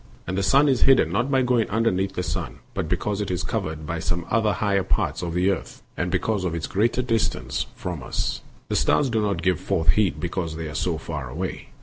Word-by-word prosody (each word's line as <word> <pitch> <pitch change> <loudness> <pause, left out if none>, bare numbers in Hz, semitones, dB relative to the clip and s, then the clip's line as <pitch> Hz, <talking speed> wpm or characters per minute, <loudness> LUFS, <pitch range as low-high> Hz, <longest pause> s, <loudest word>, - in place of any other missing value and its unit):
And 90 - -3
the 100 - +1
sun 140 +9 +5
is 130 -3 +2
hidden 130 -12 +5
not 120 +8 +1
by 135 -2 +3
going 120 -3 +2
underneath 100 -3 +1
the - - 0
earth, - - -3 0.2
but 80 - -2
because 100 +3 -1
it 100 - -2
is 90 -1 -1
covered 80 -1 -3
by 85 +2 -3
some 85 +2 -2
of 115 - +4
the 105 -2 +2
higher 100 0 +1
parts 95 - 0
of 85 -1 -3
the 90 +2 +3
earth, 95 - -5
and - - -1
because 105 -4 0
of 85 -2 -1
its 80 - -2
greater 115 +5 +1
distance 115 -3 -1
from 90 -5 -5
us. - - -2 0.3
The - - 0
stars 135 -4 +3
do 110 -1 +2
not 100 -2 -1
give 95 -4 +2
forth 90 -5 0
heat 95 -9 +3
because 85 -1 -3
they 80 0 -4
are 75 - -6
so 80 +2 0
far 80 -5 -5
away. 85 +8 -5
95 Hz, 235 wpm, -24 LUFS, 85-110 Hz, 0.3 s, sun